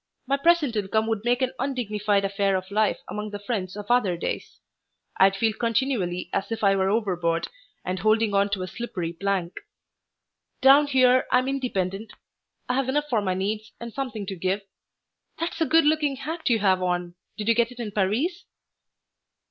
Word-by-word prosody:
My 275 +2 +1
present 300 -4 +3
income 215 +1 0
would 220 -2 -2
make 245 +2 +1
an 260 - -1
undignified 210 -6 0
affair 195 0 +1
of 185 +1 -4
life 215 +1 +2
among 210 0 -5
the 205 - -5
friends 205 -3 -4
of 205 - -6
other 210 -8 +2
days. - - -5 0.6
I'd 195 +1 +5
feel 220 +2 +1
continually 225 -6 -1
as 200 +2 -2
if 225 -1 -3
I 195 -1 +5
were 190 0 +1
overboard 180 -6 0 0.4
and 185 0 -2
holding 215 +2 +2
on 200 0 +3
to 200 -2 -2
a - - -4
slippery 180 -6 -5
plank. 185 -1 -2 1.0
Down 275 +2 +6
here 255 -2 +4
I'm 255 +1 +3
independent. 215 -6 -2 0.5
I 250 - 0
have 265 0 0
enough 295 +2 0
for 225 -3 +2
my 185 -2 -1
needs 210 +3 -3
and 235 -1 -7
something 250 -7 -4
to 195 - -5
give. 190 +3 -1 0.7
That's 335 0 -4
a 320 - +3
good 325 -1 +4
looking 300 -2 +2
hat 320 +3 -3
you 235 - +4
have 190 -3 +2
on. 175 -1 -1 0.2
Did 210 -1 -4
you 230 - +5
get 235 +1 +1
it 250 - -13
in 225 -3 -4
Paris?" 225 - 0
215 Hz, 180 wpm, -25 LUFS, 195-255 Hz, 1.0 s, Down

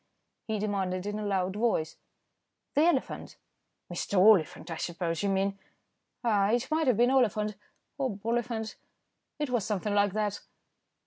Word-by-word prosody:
he 220 -1 -1
demanded 195 -3 -1
in 205 +1 -3
a - - -3
loud 190 -1 0
voice. 210 -8 0 0.8
"The 295 +3 +4
elephant." 345 - -1 0.6
"Mr. 190 +3 -2
Oliphant, 185 -4 +4
I 165 - -3
suppose 170 0 -2
you 200 - +1
mean." 195 +1 0 0.6
"Ah! 205 -4 +3
it 240 +5 0
might 315 -1 +2
have 245 -5 +4
been 240 +2 +4
Oliphant, 215 -5 +2 0.5
or 265 -1 +1
Boliphant, 225 0 -2 0.6
it 295 -3 -2
was 240 -4 +1
something 210 0 -1
like 205 -1 +3
that." 210 -1 -1
210 Hz, 145 wpm, -29 LUFS, 195-235 Hz, 0.8 s, The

